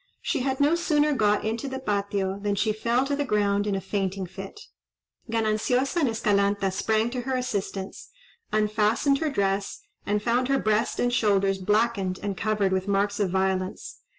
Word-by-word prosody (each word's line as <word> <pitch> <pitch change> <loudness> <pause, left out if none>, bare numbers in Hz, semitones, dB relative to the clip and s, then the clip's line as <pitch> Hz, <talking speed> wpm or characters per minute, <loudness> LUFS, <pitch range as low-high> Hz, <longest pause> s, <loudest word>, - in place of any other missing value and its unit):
She - - 0
had 265 +1 -1
no 290 +3 +4
sooner 300 -3 +2
got 210 -5 +2
into 225 +4 -2
the 265 0 -4
Patio, 200 -5 -1
than 205 0 -1
she 215 +2 +1
fell 235 +4 +1
to 285 +1 -1
the 290 - -1
ground 205 -4 +1
in 200 - 0
a - - -1
fainting 195 -1 -2
fit. 195 - -9 0.7
Gananciosa 230 +7 +1
and 285 -6 +2
Escalanta 200 -3 +1
sprang 220 +3 +1
to 250 0 -3
her 260 +1 -2
assistance, 200 -6 -4 0.4
unfastened 215 +6 +2
her 315 - 0
dress, 195 -6 -1 0.2
and 210 +1 0
found 245 +2 +1
her 275 0 +2
breast 215 -1 0
and 245 0 +1
shoulders 195 -4 +2
blackened 205 -1 0
and 200 -1 -2
covered 205 -1 0
with 190 +1 -1
marks 200 +1 0
of 200 -3 +1
violence. 190 0 -2
210 Hz, 175 wpm, -26 LUFS, 200-245 Hz, 0.7 s, no